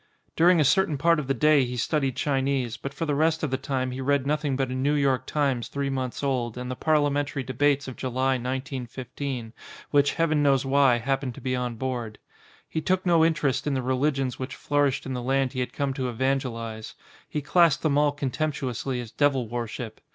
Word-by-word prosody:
During 175 +1 +5
a - - +5
certain 155 0 +3
part 165 +3 +3
of 145 - -4
the 135 - +2
day 150 +2 +4
he 125 0 -4
studied 135 0 0
Chi 140 -3 +1
nese, 130 -4 -1
but 140 - -4
for 165 +4 -4
the 150 - 0
rest 160 +2 +1
of 150 - -1
the 130 - +1
time 130 -1 -2
he 130 +1 -5
read 140 0 +1
nothing 145 -1 0
but 130 -1 -1
a - - -2
New 135 +3 +1
York 135 -3 +1
Times 135 -6 0
three 140 -1 -2
months 130 0 -3
old 125 -4 -1
and 125 0 -4
the - - -3
Parliamentary 145 -2 +1
debates 140 +2 +1
of 130 - -7
July, 130 +1 0
1915, 130 -1 -4 0.4
which, 145 -1 +3
heaven 155 -3 +2
knows 140 -2 +3
why, 135 -2 +4
happened 135 +1 -2
to - - -9
be 130 -1 -1
on 125 -1 -2
board. 120 -3 -4 0.5
He 160 - -3
took 185 +3 0
no 170 -2 +4
interest 150 -4 +1
in 140 - +1
the 130 - -1
religions 130 0 0
which 130 0 -5
flourished 145 -2 0
in 135 - -4
the 125 - -3
land 135 +1 0
he 130 - -3
had 125 - -2
come 140 -2 -2
to 130 -2 -2
evangelise. 115 -3 -2 0.3
He 150 - -3
classed 165 -1 +3
them 155 -3 +2
all 150 0 +3
contemptuously 135 -3 -2
as 120 -3 -7
devil 135 -5 +1
worship. 120 -1 -5
135 Hz, 210 wpm, -26 LUFS, 125-145 Hz, 0.5 s, During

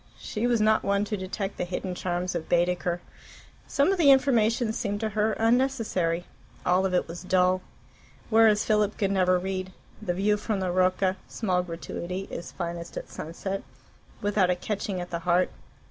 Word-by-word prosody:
She 220 +3 -2
was 240 -2 +2
not 215 0 +4
one 200 +1 +1
to 210 - -2
detect 195 +1 -4
the - - -1
hidden 180 +1 -3
charms 180 0 -2
of 170 -2 -4
Baedeker. 175 0 +1 0.7
Some 285 +6 +2
of 390 - 0
the 300 -4 +6
information 240 -4 +4
seemed 205 -3 -2
to 220 - 0
her 215 +1 +1
unnecessary, 225 -8 +1 0.4
all 185 +2 +3
of 185 - -1
it - - +1
was 170 +1 -7
dull. 185 0 +2 0.7
Whereas 220 -1 +5
Philip 210 -1 +2
could 195 -2 +1
never 185 -2 +3
read 185 0 -3 0.3
"The 180 -5 -2
view 210 +3 +2
from 210 -1 -2
the 185 -1 -1
Rocca 185 +1 +2
(small 185 -5 0
gratuity) 180 +2 -5
is 170 - -6
finest 170 -1 -5
at - - -6
sunset" 190 +5 -5 0.6
without 205 -3 +2
a 180 - +3
catching 195 0 -3
at 175 0 -6
the 170 - -2
heart. 180 +2 +2
190 Hz, 175 wpm, -27 LUFS, 180-215 Hz, 0.7 s, the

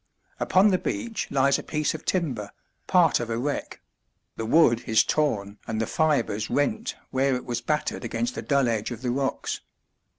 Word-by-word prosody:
Upon 190 +3 +4
the 185 -2 +2
beach 230 -3 -3
lies 140 0 +3
a - - -4
piece 150 0 -1
of 160 - -8
timber, 130 - -1 0.4
part 175 -4 +4
of 120 -1 -4
a 115 - -1
wreck; 140 +4 -3 0.5
the 115 - -4
wood 120 -4 +4
is 110 - +5
torn 105 -9 -1
and 110 -1 -2
the 115 - +1
fibres 120 -7 0
rent 220 - 0 0.2
where 135 0 +2
it 125 - -5
was 120 -1 -2
battered 150 -1 -1
against 240 +2 -2
the - - -5
dull 140 -3 +2
edge 110 -3 -1
of 120 0 -7
the 125 - 0
rocks. 135 +1 -2
135 Hz, 185 wpm, -26 LUFS, 115-160 Hz, 0.5 s, is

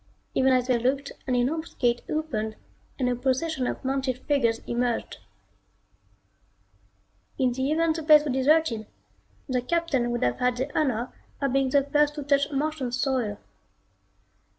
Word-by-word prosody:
Even 265 0 +3
as 255 -1 +3
they 250 -2 +2
looked 275 +4 0 0.2
an 255 - +1
enormous 305 +7 -1
gate 240 -1 +1
opened 220 -9 -2 0.4
and 255 - 0
a 250 - +1
procession 260 +2 -1
of - - -5
mounted 265 -1 -1
figures 235 -6 +2
emerged. 240 0 -2 2.2
In 255 -2 +2
the 260 +3 -1
event 325 0 +2
the - - -3
place 305 -1 +7
was 285 -4 -2
deserted, 265 -5 +2 0.6
the 255 -2 0
Captain 280 -4 0
would 240 0 -1
have 120 0 0
had 250 0 +1
the 265 +3 -4
honor 250 -5 0 0.3
of 275 -2 0
being 270 -1 +2
the 280 +1 +3
first 295 +1 +2
to 295 - -4
touch 280 +1 +2
Martian 285 -2 -2
soil. 250 -5 -1
265 Hz, 150 wpm, -26 LUFS, 245-295 Hz, 2.2 s, place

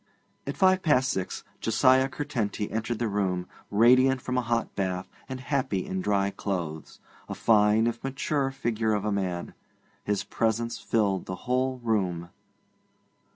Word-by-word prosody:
At - - -4
five 185 0 +4
past 135 -6 +3
six 95 -1 -3 0.2
Josiah 130 +4 +4
Curtenty 120 -8 -3
entered 115 +1 -2
the 120 - -1
room, 95 -3 -1 0.2
radiant 130 +5 +5
from 125 0 -3
a 125 - +2
hot 115 -1 -1
bath, 95 -1 -2 0.2
and 130 0 -5
happy 130 -8 -1
in 95 0 -3
dry 100 0 +1
clothes 85 -7 -4 0.3
a - - -4
fine, 105 0 +4
if 120 0 -2
mature, 135 +1 -1
figure 115 -5 -1
of 105 0 -2
a 105 - 0
man. 90 -3 -2 0.5
His 105 -1 -1
presence 115 +1 -1
filled 100 -5 0
the 95 - -3
whole 130 +1 +1
room. 90 -7 -1
110 Hz, 150 wpm, -27 LUFS, 100-130 Hz, 0.5 s, radiant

